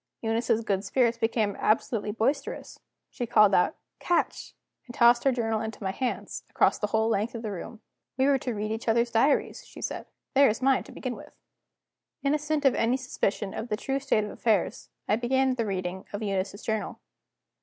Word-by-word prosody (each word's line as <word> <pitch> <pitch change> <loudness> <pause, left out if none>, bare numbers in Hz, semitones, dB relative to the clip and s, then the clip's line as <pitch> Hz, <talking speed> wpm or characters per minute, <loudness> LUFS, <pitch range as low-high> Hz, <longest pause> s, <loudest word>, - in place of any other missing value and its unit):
Eunice's 225 0 0
good 195 -2 0
spirits 235 +1 +1
became 225 -3 0
absolutely 215 0 +1
boisterous. 270 +7 -2 0.3
She 245 -3 -4
called 210 -3 +5
out: 180 - +3 0.2
"Catch!" 350 - -1 0.3
and 240 - -10
tossed 240 0 +5
her 270 - +5
journal 225 -3 -1
into 220 -1 -6
my 190 - -1
hands, 250 +5 -3
across - - +2
the 210 - 0
whole 220 +1 +1
length 225 +1 0
of 230 - -5
the 215 - -3
room. 210 +4 -7 0.4
"We 265 - +3
were 275 -1 +3
to 245 -2 -3
read 210 +1 -3
each 225 +2 -4
other's 235 +1 +2
diaries," 270 +6 +2
she - - -13
said. - - -4 0.3
"There 275 -1 +6
is 215 - -1
mine 265 0 +2
to - - -12
begin 255 -2 -5
with." - - -13 0.9
Innocent 295 +1 0
of 270 - +6
any 235 +3 +1
suspicion 210 -6 -2
of 225 - -4
the 210 - -1
true 270 +4 -2
state 265 -6 +1
of 210 - -5
affairs, 215 -5 0 0.2
I 210 - +2
began 260 +2 +2
the 230 -3 -2
reading 185 -1 -3
of 205 +2 -3
Eunice's 195 +1 -2
journal. 220 -1 -3
230 Hz, 190 wpm, -27 LUFS, 210-255 Hz, 0.9 s, There